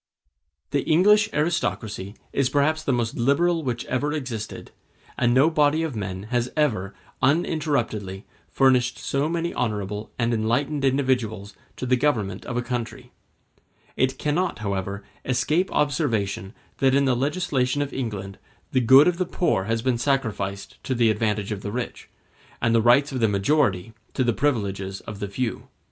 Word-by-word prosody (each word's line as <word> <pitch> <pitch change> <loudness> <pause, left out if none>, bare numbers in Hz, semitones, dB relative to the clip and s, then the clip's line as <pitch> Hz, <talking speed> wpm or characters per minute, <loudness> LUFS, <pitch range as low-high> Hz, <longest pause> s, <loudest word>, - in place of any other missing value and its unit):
The 140 0 +1
English 210 +8 +4
aristocracy 110 - -2 0.2
is 135 -2 +2
perhaps 150 +3 +2
the 140 - 0
most 120 -2 -1
liberal 165 +7 +2
which 120 -3 -3
ever 145 +4 -1
existed, 120 -8 -5 0.4
and 120 - +2
no 135 +6 +4
body 150 +1 +3
of 155 -6 -3
men 95 -2 -4
has 120 0 +1
ever, 110 -11 0 0.3
uninterruptedly, 130 - 0 0.2
furnished 125 -2 +3
so 140 +3 -1
many 170 0 -2
honorable 105 -2 -3
and 120 -1 +1
enlightened 120 +6 0
individuals 125 -7 0 0.2
to - - -5
the 125 0 +3
government 110 -9 0
of 120 - -3
a 120 - 0
country. 125 0 -5 0.8
It 130 0 +1
cannot, 170 +5 0
however, 100 -1 -3 0.2
escape 150 +8 +1
observation 115 - -1 0.2
that 135 -1 +3
in 140 0 +3
the 130 -2 +2
legislation 145 -1 0
of 140 - -7
England 100 -6 -5 0.3
the 130 - +2
good 130 +6 +7
of 180 0 +1
the 185 - 0
poor 170 - 0
has 115 +1 -1
been 125 -2 +1
sacrificed 110 -7 -2
to 130 - -1
the 115 -2 +4
advantage 105 -1 -1
of 100 -2 -3
the 100 - -4
rich, 125 +2 -5 0.5
and 115 0 +1
the 115 - +4
rights 125 +6 +4
of 130 - -3
the 115 - +3
majority 105 -1 +1 0.2
to 130 - +2
the 120 -1 +2
privileges 100 -8 -1
of 105 -3 -8
the 100 - -3
few. 115 +4 -3
125 Hz, 160 wpm, -24 LUFS, 105-145 Hz, 0.8 s, good